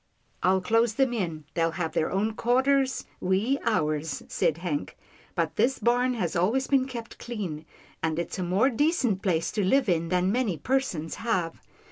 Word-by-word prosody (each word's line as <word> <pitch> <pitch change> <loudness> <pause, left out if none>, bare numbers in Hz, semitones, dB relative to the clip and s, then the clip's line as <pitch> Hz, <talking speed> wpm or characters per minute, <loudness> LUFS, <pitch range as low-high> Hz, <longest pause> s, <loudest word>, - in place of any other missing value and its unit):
" - - -40
I'll 190 +1 +3
close 225 +3 +2
them 265 -1 +2
in 165 -9 -3
— - - -40
they'll 165 -1 +1
have 165 -3 -1
their 155 - +1
own 210 +4 0
quar 245 +4 +2
ters, 275 -1 +1
we 205 +9 +1
ours," 155 -8 0
said 155 - +1
Hank, 165 -4 -3 0.2
" - - -28
but - - -1
this 265 +2 +2
barn 245 +1 +2
has 180 -8 -2
always 220 +10 +2
been 265 -1 +2
kept 235 -3 -8
clean, 190 -10 -5 0.4
and 160 -1 -1
it's 170 +2 -3
a - - 0
more 195 +10 +2
decent 255 - +1
place 170 -4 0
to 210 - 0
live 265 +8 +3
in 170 -2 +1
than 180 +1 +2
many 225 -7 0
persons 215 - -1
have. 185 -8 -1
200 Hz, 190 wpm, -27 LUFS, 170-250 Hz, 0.4 s, I'll